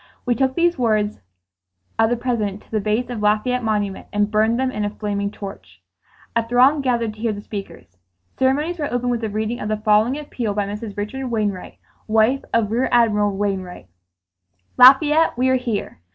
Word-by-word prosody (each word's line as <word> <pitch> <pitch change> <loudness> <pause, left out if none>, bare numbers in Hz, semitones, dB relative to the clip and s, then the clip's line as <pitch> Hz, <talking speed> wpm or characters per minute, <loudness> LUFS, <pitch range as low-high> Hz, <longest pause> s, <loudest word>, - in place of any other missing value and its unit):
We 245 - +2
took 260 +2 0
these 345 -3 +1
words 215 -3 0 0.8
of 225 0 +4
the 240 - 0
President 215 -5 -2
to - - -27
the 220 - 0
base 220 +4 -1
of 230 -3 -4
Lafayette 215 +4 +1
Monument 205 -3 -2
and 205 0 0
burned 220 +2 +2
them 260 0 0
in 210 -4 -3
a 205 - 0
flaming 205 -1 -3
torch. 95 - -10 0.6
A 230 - +3
throng 255 +5 +4
gathered 235 -4 0
to 215 - -17
hear 225 -1 -1
the 205 - -7
speakers. 195 - -9 0.4
Ceremonies 295 +7 +1
were 290 - -2
opened 245 0 -1
with 235 -1 -1
the 220 - -2
reading 220 +3 -3
of 210 - -4
the 215 - 0
following 215 +5 +2
appeal 240 -8 -4
by 205 -1 0
Mrs. 210 +1 -7
Richard 255 +6 -4
Wainwright, 210 -5 -3 0.3
wife 225 +5 +2
of 225 -2 +1
Rear 245 +3 +1
Admiral 210 -4 +2
Wainwright: 190 - -4 0.9
"Lafayette, 290 +4 +6
we 255 +1 +2
are 260 - +3
here! 230 - -4
220 Hz, 185 wpm, -21 LUFS, 210-250 Hz, 0.9 s, Lafayette